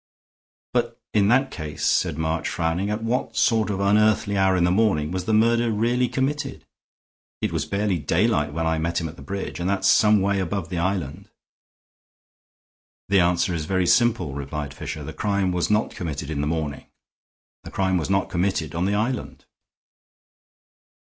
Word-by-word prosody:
"But - - -1
in 100 -2 +3
that 130 +4 +3
case," 75 -2 -5
said 85 -5 +1
March, 80 +1 -1
frowning, 85 +4 -1
"at 105 +2 -2
what 115 -1 -2
sort 110 -2 +2
of 100 -2 -2
unearthly 105 +1 +3
hour 95 -1 +3
in 90 - +2
the 90 - +3
morning 90 -7 +2
was 90 -1 -3
the - - -1
murder 115 +2 +3
really 120 +3 +1
committed? 135 +3 -2 0.7
It - - -1
was - - -2
barely 100 -3 0
daylight 85 -2 +1
when 80 +2 -2
I 80 0 +1
met 85 +1 -1
him 85 - -3
at 80 - -11
the - - -13
bridge, 100 -2 -5
and 90 +2 -1
that's 95 -1 +1
some 105 +1 +5
way 100 +1 +1
above 95 -1 -3
the 90 -2 -3
island." 90 -5 -3 1.8
"The 100 -1 +4
answer 85 0 +2
is 80 -3 -3
very 95 +1 +1
simple," 110 - +2
replied 70 0 -5
Fisher. - - -6
"The - - -7
crime 100 -2 0
was 90 -1 0
not 105 +1 +1
committed 80 -4 -5
in 70 -2 -2
the 75 - -1
morning. 75 -3 -3 0.8
The - - -9
crime 95 -1 0
was 80 - -3
not 95 0 +1
committed 85 -3 -1
on 85 +2 -1
the 100 +1 +1
island." 120 +4 -3
95 Hz, 175 wpm, -23 LUFS, 80-105 Hz, 1.8 s, some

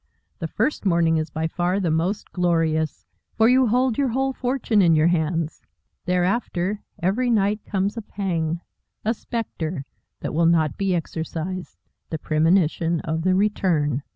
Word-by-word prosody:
The 165 - -2
first 240 - -1
morning 170 -4 +3
is 155 0 -2
by 160 +2 -2
far 175 +3 0
the 175 -5 0
most 175 +6 -1
glorious, 165 -3 0 0.3
for 225 - +5
you 255 +1 +5
hold 250 +1 +2
your 280 - +3
whole 265 +2 0
fortune 250 -5 +1
in 170 -3 +5
your 155 0 +4
hands. 165 -1 -1 0.4
Thereafter, 180 +1 0 0.2
every 230 +8 +1
night, 210 -2 +2
comes 200 +2 -1
a - - -2
pang, 170 -6 -2 0.4
a 225 - +2
spectre, 175 - -4 0.4
that - - -3
will 165 +2 +3
not 160 -4 +3
be 195 -2 0
exorcised 170 +2 -4 0.3
the 160 - -2
premonition 165 +1 +2
of 160 0 -2
the 185 +2 +2
return. 170 -9 +1
180 Hz, 155 wpm, -23 LUFS, 160-210 Hz, 0.4 s, for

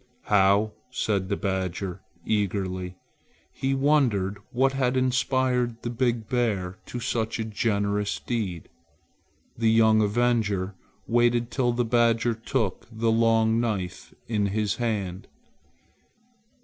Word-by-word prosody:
"How!" 100 +1 +3 0.2
said 100 -6 -1
the 100 - 0
badger 95 -1 -3 0.2
eagerly. 95 -3 -1 0.6
He 135 0 -1
wondered 125 -9 +2
what 135 +2 +2
had 130 -1 0
inspired 130 -2 +1
the 120 - -2
big 120 -2 0
bear 100 -7 -1
to 120 - -5
such 115 -2 -1
a 115 - -2
generous 105 -1 -1
deed. 100 -9 -3 0.9
The 115 -1 +2
young 110 -1 +5
avenger 105 -3 +1 0.3
waited 120 0 +2
till 120 0 +1
the 120 0 0
badger 115 0 +2
took 110 -2 -2
the 115 0 0
long 115 0 +3
knife 100 -7 -3 0.2
in 105 -3 0
his 105 0 -1
hand. 100 -6 -2
110 Hz, 115 wpm, -26 LUFS, 100-120 Hz, 0.9 s, young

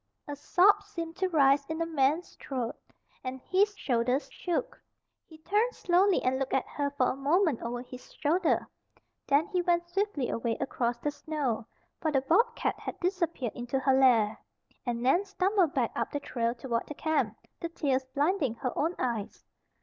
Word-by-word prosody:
A 290 - -4
sob 390 +7 +4
seemed 335 -5 -6
to 375 -1 0
rise 280 -4 +4
in 320 - -3
the 330 - 0
man's 310 +1 0
throat, 250 -4 -4 0.5
and 260 0 -4
his 400 +8 +1
shoulders 250 +2 0
shook. 350 -2 -3 0.5
He 320 - -14
turned 420 +9 0
slowly 370 +2 +3
and 260 +1 +1
looked 270 -1 -1
at 265 - 0
her 285 -1 -1
for 255 - +3
a - - -4
moment 295 - +2
over 240 +1 -4
his 255 0 -12
shoulder. 330 +4 +1 0.6
Then 285 +3 +4
he 365 -3 0
went 345 -1 +1
swiftly 370 - -1
away 230 -1 -1
across 240 -3 -1
the 295 +5 -2
snow 285 -6 -3 0.3
(for 315 - +1
the 270 -2 +2
bobcat 455 - +1
had - - -6
disappeared 340 - -1
into 245 +2 -3
her 265 0 +2
lair) 240 -5 +4 0.5
and 235 0 -1
Nan 270 +10 +4
stumbled 385 -4 +1
back 245 -4 +1
up - - -1
the 290 - -3
trail 235 -3 -2
toward 235 -1 -2
the 295 - -7
camp, 315 +1 0 0.2
the 335 - -4
tears 275 -5 0
blinding 290 - +1
her 250 +1 -3
own 330 +4 0
eyes. 235 -5 -3
290 Hz, 175 wpm, -29 LUFS, 255-350 Hz, 0.6 s, sob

